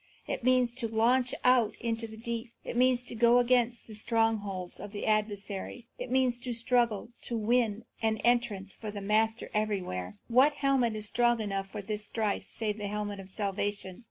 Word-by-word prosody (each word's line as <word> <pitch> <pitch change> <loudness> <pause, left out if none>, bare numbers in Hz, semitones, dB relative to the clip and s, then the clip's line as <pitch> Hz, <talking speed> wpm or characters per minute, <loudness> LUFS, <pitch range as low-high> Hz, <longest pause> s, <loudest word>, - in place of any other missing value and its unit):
It - - -4
means 255 -1 +3
to 235 -3 -1
launch 240 +3 +2
out 245 -4 +4
into 230 -1 0
the 220 0 -11
deep. 235 +1 -4
It - - -5
means 250 0 +4
to 245 - -5
go 235 +1 +5
against 245 -1 +2
the 220 - -11
strongholds 215 -5 -1
of 205 - -8
the 205 - -4
adversary. 210 +1 -2
It 250 0 -5
means 255 -1 +2
to 245 0 -4
struggle 235 -2 +1 0.2
to 235 - -2
win 225 -1 +1 0.2
an 220 -1 +1
entrance 235 -5 +1
for 215 - -7
their 205 -1 -6
Master 220 +2 +1
everywhere. 185 - -2
What 260 +5 +5
helmet 270 -6 +1
is 215 0 0
strong 240 +1 +2
enough 195 -2 -2
for 200 +1 -7
this 210 +1 -2
strife 215 -3 -2
save 215 -2 -2
the 205 - -3
helmet 205 -1 -3
of 190 -1 -9
salvation? 200 -1 -3
225 Hz, 185 wpm, -30 LUFS, 205-240 Hz, 0.2 s, go